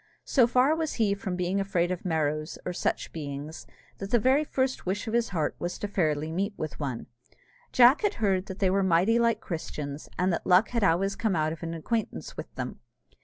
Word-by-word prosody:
So 250 -4 +4
far 255 +5 +3
was 320 -2 -2
he 215 -4 +2
from 195 -2 -4
being 180 +2 0
afraid 180 -3 0
of 180 - -4
Merrows, 155 -2 -1
or 180 - -2
such - - -2
beings, 145 0 -6 0.3
that 195 - -5
the 240 - +4
very 260 +6 +3
first 260 -3 -1
wish 195 +5 -2
of 220 - -3
his 235 0 +2
heart 160 -6 -1
was 175 +1 -3
to 205 - -3
fairly 155 -6 0
meet 200 +5 -2
with 155 -2 -5
one. 135 -6 -3 0.7
Jack 250 +3 +6
had 415 -1 +1
heard 195 -3 0
that 190 - -6
they 190 -3 +2
were 195 +1 +2
mighty 190 +5 +3
like 235 -1 +2
Christians, 150 -3 -5
and 180 +1 +2
that - - -3
luck 185 +4 +5
had 235 -3 -1
always 195 +2 +2
come 215 -4 0
out 155 0 +1
of 165 - -10
an 165 0 -4
acquaintance 220 +8 -3
with - - -7
them. - - -5
190 Hz, 215 wpm, -28 LUFS, 165-225 Hz, 0.7 s, Jack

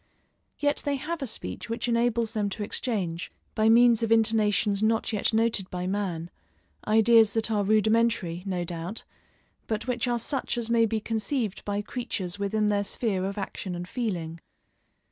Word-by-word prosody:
Yet 290 0 +1
they 285 -1 0
have 310 +4 -4
a 270 - -2
speech 90 - -6
which 230 +1 -2
enables 235 -1 +1
them 210 -3 -1
to 210 - -3
exchange, 190 -6 -2 0.2
by 215 0 +3
means 235 0 +6
of 225 -1 -1
intonations 215 -2 +3
not 225 +1 +1
yet 210 - +1
noted 220 -4 +1
by 180 0 -4
man, 180 -4 -2 0.6
ideas 220 0 +5
that 225 0 +2
are 210 -2 +2
rudimentary, 215 -4 +2
no 180 -2 -1
doubt, 175 +5 -4 0.6
but 220 0 -2
which 245 -1 -1
are 240 -1 +1
such 250 +2 -2
as 235 -1 -2
may 230 -1 +4
be 220 0 -1
conceived 220 0 -2
by 205 0 -2
creatures 200 -6 -4
within 210 +2 0
their 205 -1 +2
sphere 200 -2 -1
of 200 +1 -4
action 190 -2 -4
and 175 +1 -6
feeling. 175 -9 -3
215 Hz, 165 wpm, -27 LUFS, 195-230 Hz, 0.6 s, means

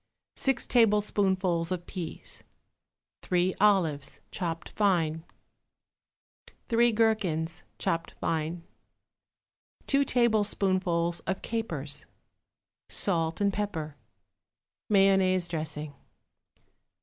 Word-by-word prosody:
6 270 -2 +1
tablespoonfuls 195 -6 +2
of 175 -1 -3
peas. 175 -4 -5 0.8
3 180 +1 +1
olives, 175 -9 +2
chopped 165 -3 -3
fine. 165 -6 +1 1.5
3 235 0 +4
gherkins, 205 -8 0 0.2
chopped 165 0 -1
fine. 165 +1 -2 1.2
2 280 0 +3
tablespoonfuls 195 -8 +1
of 190 +2 -2
capers. 155 -11 -4 0.8
Salt 165 -4 +1
and 200 -1 +2
pepper. 165 -8 -3 0.9
Mayonnaise 195 -3 +4
dressing. 155 -3 -3
185 Hz, 75 wpm, -28 LUFS, 165-205 Hz, 1.5 s, 3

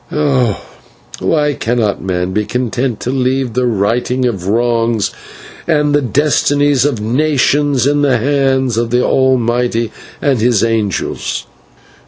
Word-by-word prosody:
Oh! 130 -8 +1 0.6
why 150 -2 +1
cannot 115 -5 -1
man 90 -1 -2
be 105 +2 0
content 120 0 -2
to 125 - -2
leave 130 -2 -1
the 125 +1 +1
righting 120 +4 0
of 95 -7 -2
wrongs 115 -1 +1 0.6
and 150 -3 +2
the 145 - +3
destinies 145 +1 +2
of 140 -6 0
nations 140 +2 +1
in 145 +1 +2
the 135 -4 +3
hands 135 -1 +1
of 115 0 0
the 125 +1 +1
Almighty 120 -3 +1 0.3
and 135 -5 +1
His 115 -3 +2
angels?" 110 -5 -2
125 Hz, 130 wpm, -14 LUFS, 115-140 Hz, 0.6 s, the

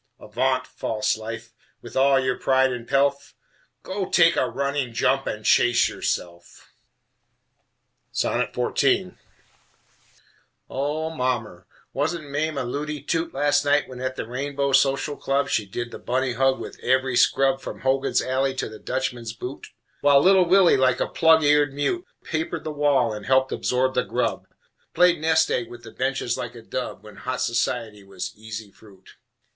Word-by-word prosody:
Avaunt, 130 +4 -1
false 110 0 -2
Life, 115 +1 -8 0.3
with 120 - -11
all 135 0 +4
your 130 -1 0
pride 130 0 +2
and 120 -1 -7
pelf: 140 0 +1 0.5
Go 190 0 -4
take 170 -1 +5
a - - +1
running 140 -3 -2
jump 135 +3 +1
and 105 0 -4
chase 120 -1 +4
yourself! 85 -1 -5 1.4
XIV - - 0 1.6
O 150 +4 -2
mommer! 115 - -3 0.3
wasn't 155 +2 -2
Mame 150 +1 -1
a - - -1
looty 145 +4 -4
toot 165 0 -1
Last 145 +1 +2
night 145 0 +2
when 125 -1 -9
at 130 0 -3
the - - -4
Rainbow 140 +3 -2
Social 135 +2 +2
Club 140 0 -1
She 105 -3 0
did 120 +4 -5
the - - -8
bunny 130 0 -1
hug 135 +2 +2
with - - -8
every 130 0 +1
scrub 135 +2 +3
From - - -8
Hogan's 135 +1 +1
Alley 130 +1 0
to - - -2
the 110 0 -11
Dutchman's 125 -4 -3
Boot, 125 +4 -7 0.3
While 145 -1 +5
little 190 -1 +5
Willie, 185 0 +5
like 130 -1 +2
a - - +1
plug 160 -1 +4
eared 145 -1 +3
mute, 350 - -1 0.2
Papered 160 +1 -3
the 155 - -4
wall 145 -6 +2
and 105 -1 -8
helped 130 0 +3
absorb 130 +1 0
the 125 - +1
grub, - - -2 0.5
Played 175 -3 +4
nest 160 0 +3
egg 120 -2 -1
with 120 0 -11
the 115 - -10
benches 130 -2 -2
like 120 0 -5
a 115 - -11
dub 125 +2 -5
When 105 -1 -13
hot 130 0 -4
society 115 -3 -1
was 95 -2 -6
easy 110 -1 -8
fruit! 100 -3 -19
130 Hz, 160 wpm, -24 LUFS, 120-145 Hz, 1.6 s, take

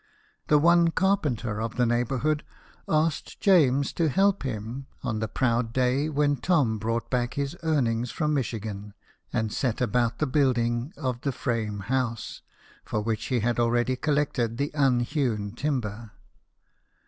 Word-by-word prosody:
The 150 - +5
one 170 +2 +5
carpenter 150 - 0
of 115 0 -3
the 125 - +2
neighbourhood 130 +6 0 0.5
asked 155 0 0
James 145 - +4
to 165 -2 +1
help 195 +6 +2
him, 125 +1 -5 0.2
on 115 -4 -2
the 110 - -1
proud 115 0 0
day 130 +4 +1
when 145 -1 +1
Tom 130 -8 +1
brought 115 +1 -2
back 120 -1 0
his 140 +3 -2
earnings 125 -7 +1
from 150 +3 -1
Michigan, 105 -6 -3 0.4
and 110 -1 -1
set 120 -5 -1
about 120 -2 +1
the 155 - +1
building 125 -2 +1
of 130 -4 -3
the 140 - -1
frame 110 -5 -2
house, 125 0 -2 0.4
for 110 - -2
which 110 0 -2
he 125 -3 0
had 120 +2 0
already 120 +2 +2
collected 130 -5 0
the 140 +2 -1
unhewn 125 -6 +1
timber. 120 -4 -3
125 Hz, 145 wpm, -26 LUFS, 115-145 Hz, 0.5 s, The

